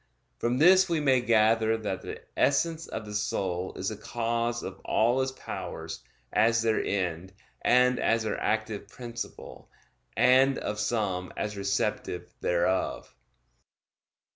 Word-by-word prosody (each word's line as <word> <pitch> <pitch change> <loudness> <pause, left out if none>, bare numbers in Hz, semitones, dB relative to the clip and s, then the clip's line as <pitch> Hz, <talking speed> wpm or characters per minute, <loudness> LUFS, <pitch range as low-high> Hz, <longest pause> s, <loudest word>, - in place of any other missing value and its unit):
From 120 +1 0
this 185 +5 +6
we 165 -2 +1
may 135 -4 +3
gather 115 -1 +3
that 105 -4 -4
the - - -7
essence 165 +3 +1
of 110 - -6
the 105 - -8
soul 95 -3 -2
is 95 - -2
the 110 - -5
cause 115 +2 -2
of - - -7
all 120 +4 +2
its 130 0 -1
powers, 130 - -6 0.3
as 115 +2 +3
their 110 -1 +1
end, 90 -2 -2 0.3
and 125 +1 +4
as 115 -1 +2
their 110 - -3
active 105 -1 -1
principle; 120 +1 -8 0.5
and 130 +3 +5
of 105 0 -4
some 100 -5 -1
as 105 0 -3
receptive 100 0 -2
thereof. 90 +2 0
115 Hz, 135 wpm, -28 LUFS, 105-125 Hz, 0.5 s, this